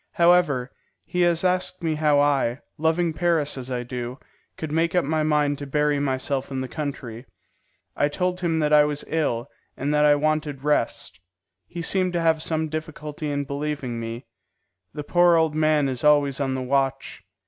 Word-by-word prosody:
However, 170 -8 +3 0.3
he 180 - -2
has 170 -1 +2
asked 185 -1 0
me 160 -1 +1
how 150 -1 +2
I, 140 -3 +1 0.2
loving 160 +1 +1
Paris 160 -2 0
as 130 -1 -6
I 125 -1 -2
do, 125 0 -5 0.4
could 160 -2 -5
make 165 +2 +1
up 180 - +2
my 155 +2 0
mind 150 -2 +1
to 145 - -6
bury 150 +1 +1
myself 135 0 -1
in 135 -1 -3
the 130 - -4
country. 130 -5 -6 0.7
I 145 - +2
told 180 +4 -2
him 170 -3 0
that 150 0 +1
I 150 0 +7
was 150 0 -2
ill, 145 -7 -1 0.3
and 145 +3 -1
that 150 0 +3
I 145 0 +6
wanted 150 -2 -1
rest. 150 -9 -1 0.5
He 170 -1 -6
seemed 185 +1 +1
to 170 - 0
have 160 -1 +2
some 160 0 -1
difficulty 155 -1 -5
in 145 0 -1
believing 140 -4 -4
me. 115 +2 -6 0.7
The 150 0 -6
poor 175 +3 +4
old 160 -2 +2
man 155 -2 +2
is 130 -2 -4
always 145 -2 +3
on 135 -2 -1
the 130 - -3
watch. 135 +1 -1
150 Hz, 180 wpm, -24 LUFS, 140-160 Hz, 0.7 s, I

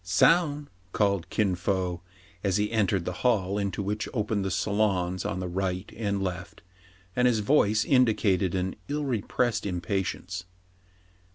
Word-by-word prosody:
" - - -35 0.2
Soun! 150 -4 +4
" 95 0 -34
called 100 -4 +1
Kin 100 -4 +1
Fo, 90 -1 -1 0.4
as 95 -2 +2
he 105 +1 0
entered 100 -5 +1
the - - -1
hall 105 -5 +2
into 100 0 -2
which 105 +2 -2
opened 105 -2 0
the 95 - -1
salons 95 -1 0
on 90 - -2
the 90 - -3
right 90 +1 -3
and 100 -3 -1
left; 95 0 -5 0.5
and 125 0 +4
his 115 -3 +2
voice 105 -3 +3
indicated 105 -8 +3
an 95 0 -1
ill 145 +1 -2
repressed 120 -1 0
impatience. 95 0 -3
100 Hz, 155 wpm, -27 LUFS, 95-110 Hz, 0.5 s, Soun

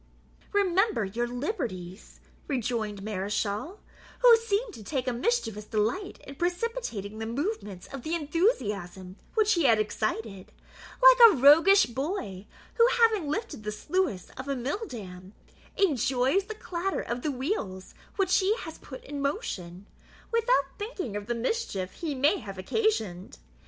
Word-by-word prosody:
"Remember 390 - +2
your 235 +5 -2
liberties," 230 - -5 0.3
rejoined 225 -6 -2
Mareschal, 210 - -3 0.4
who - - +9
seemed 455 0 -1
to 215 - -10
take 260 +3 -3
a 250 - +1
mischievous 235 - -1
delight 225 - -2
in 275 - -8
precipitating 350 - -3
the 220 - -4
movements 235 - -4
of 275 - -5
the 320 +6 -2
enthusiasm 210 - -1 0.2
which 435 -1 +4
he 340 -4 +1
had 230 -4 +6
excited, 215 -2 -3 0.5
like - - +10
a - - 0
roguish 325 +9 +7
boy, 235 - -4 0.3
who, 465 0 +6
having 440 -9 +3
lifted 410 - -3
the 210 - -3
sluice 305 - -2
of 260 +2 -6
a 275 - -1
mill 285 - -3
dam, 185 -4 -9 0.4
enjoys 275 - +2
the 435 +1 -7
clatter 380 -2 -3
of 240 +1 -4
the 305 - -1
wheels 250 - -4 0.2
which 380 -2 +2
he 405 +3 +1
has 325 -2 -8
put 260 - -10
in 285 0 -6
motion, 200 - -4 0.5
without 460 - +1
thinking 410 - -4
of 205 0 -5
the 240 - -1
mischief 230 - -2
he 310 -4 -4
may 290 +9 +3
have 195 -2 -8
occasioned. 200 - -1
270 Hz, 145 wpm, -28 LUFS, -, 0.5 s, like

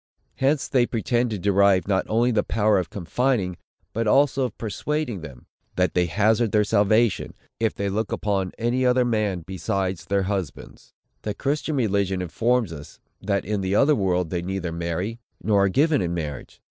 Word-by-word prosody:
Hence 135 +2 +1
they 125 -3 +2
pretend 120 +1 0
to 110 - -3
derive 100 0 +3
not 95 -2 +1
only 120 +3 +2
the 110 -3 +2
power 105 -2 +2
of 90 - -4
confining, 100 0 -1 0.4
but 115 0 -1
also 135 +2 +3
of 120 - -6
persuading 120 - -3
them, 70 -6 -11 0.3
that 90 0 +1
they 90 -1 +2
hazard 110 +5 +2
their 105 -1 +3
salvation, 110 +1 +2 0.2
if 110 -1 0
they 100 - -2
look 105 +2 -2
upon 100 -3 -1
any 120 +3 0
other 125 0 +3
man 105 -7 0
besides 95 0 -2
their 100 -1 +1
husbands. 95 -5 -5 0.3
The 105 -1 -4
Christian 150 +4 -1
religion 100 -6 0
informs 115 +3 0
us, 75 -2 -11 0.2
that 100 -3 -1
in 105 0 -1
the 95 +1 0
other 145 +7 +5
world 90 - 0
they 90 - -1
neither 90 -1 -3
marry, 85 +7 -3 0.2
nor 100 -2 +3
are - - +2
given 145 - +2
in 85 -1 -2
marriage. 75 -6 -6
105 Hz, 175 wpm, -24 LUFS, 95-120 Hz, 0.4 s, other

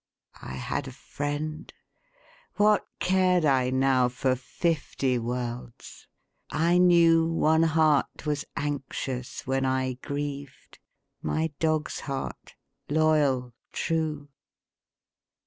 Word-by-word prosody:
I 65 - -7
had 65 - -3
a - - -7
friend; 145 +3 -5 0.8
what 210 0 +3
cared 185 -2 +2
I 130 -3 +3
now 130 -1 +3
For 130 +1 0
fifty 135 -2 -1
worlds? 120 0 -6 0.4
I 170 +3 +2
knew 170 -2 +5
One 160 -1 +3
heart 155 -3 +2
was 150 -1 -1
anxious 135 -3 -4
when 135 +1 0
I 130 -1 0
grieved 140 -1 -6 0.4
My 160 0 -1
dog's 155 -1 0
heart, 135 -2 -6 0.3
loyal, 145 -5 +2 0.2
true. 155 -3 -2
145 Hz, 95 wpm, -27 LUFS, 130-160 Hz, 0.8 s, knew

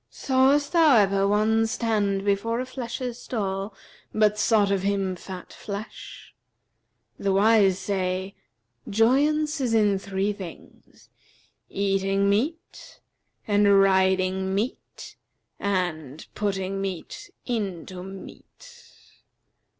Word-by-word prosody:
Sawest 275 +2 +2
thou 325 -6 +5
ever 195 -1 +3
one 220 +2 +2
stand 210 -4 -1
before 205 +4 0
a 255 - -2
flesher's 250 -1 -5
stall 195 -3 -3 0.4
but 210 -1 +2
sought 210 -2 +3
of 195 -2 +1
him 195 -1 -1
fat 180 0 -9
flesh? 205 +1 -8 0.9
The 200 - 0
wise 200 -1 +4
say, 190 0 -2 0.6
'Joyance 290 +7 +2
is 240 -3 +1
in 205 -3 +3
three 195 +1 -2
things, 190 -5 -13 0.6
eating 195 0 0
meat 295 +11 -3 0.5
and 205 -1 +4
riding 190 0 +2
meat 225 +7 -5 0.4
and 165 -7 -2
putting 195 -1 -2
meat 195 - -6 0.2
into 190 -6 -4
meat.' 475 - -12
200 Hz, 100 wpm, -25 LUFS, 190-225 Hz, 0.9 s, thou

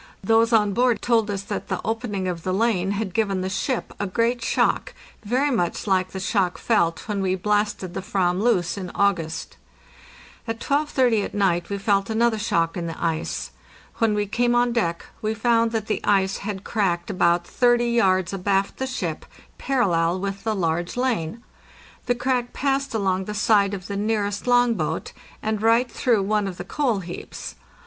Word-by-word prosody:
Those 225 +3 +3
on 210 -3 +3
board 245 +1 +2
told 225 -3 +2
us 200 -1 -2
that - - -5
the - - -2
opening 220 -4 -2
of 175 -2 -3
the 185 +2 -1
lane 195 -4 +1
had 200 -3 -3
given 200 -4 0
the 185 +1 -3
ship 225 +6 -2
a 205 - -1
great 235 +4 0
shock, - - +1 0.3
very 255 +7 +1
much 175 -9 -1
like 185 -2 +1
the 190 - -6
shock 190 -2 0
felt 170 -8 +1
when 205 -2 -1
we 190 -1 +1
blasted 205 -1 -1
the - - -3
/vam 190 -3 0
loose 200 -5 +1
in 185 -2 -5
August. 165 -5 0 0.9
At 225 0 -3
12.30 260 -6 +1
at - - -8
night 180 -4 +1
we 200 - -2
felt 200 0 +1
another 225 0 +2
shock 165 -6 0
in 170 -2 -3
the 165 - -6
ice. 165 -1 -2 0.5
When 225 -2 +2
we 205 0 0
came 240 +4 +1
on 240 0 +3
deck 170 -8 -1 0.2
we 215 +1 -1
found 230 0 +2
that 220 -2 -2
the 215 - -2
ice 195 -1 +2
had 200 -1 -5
cracked 190 -4 -1
about 175 -2 +2
30 240 +2 +2
yards 190 -6 +2
abaft 195 +1 0
the 265 - -2
ship, 260 - -3 0.4
parallel 185 -9 +1
with 195 0 -4
the 220 -1 0
large 175 +1 -1
lane. 235 -5 -1 0.6
The 245 - +2
crack 245 0 -1
passed 275 -2 -1
along 190 -3 0
the 210 - -5
side 205 -2 +3
of 185 -2 -8
the 200 0 -4
nearest 205 0 -1
long 245 -1 +4
boat, 160 -5 -3 0.3
and 215 -1 -1
right 230 +2 +3
through 225 -5 +2
one 210 0 +1
of 185 -2 -6
the 180 - -6
coal 240 -3 0
heaps. 175 0 -7
205 Hz, 185 wpm, -23 LUFS, 185-230 Hz, 0.9 s, long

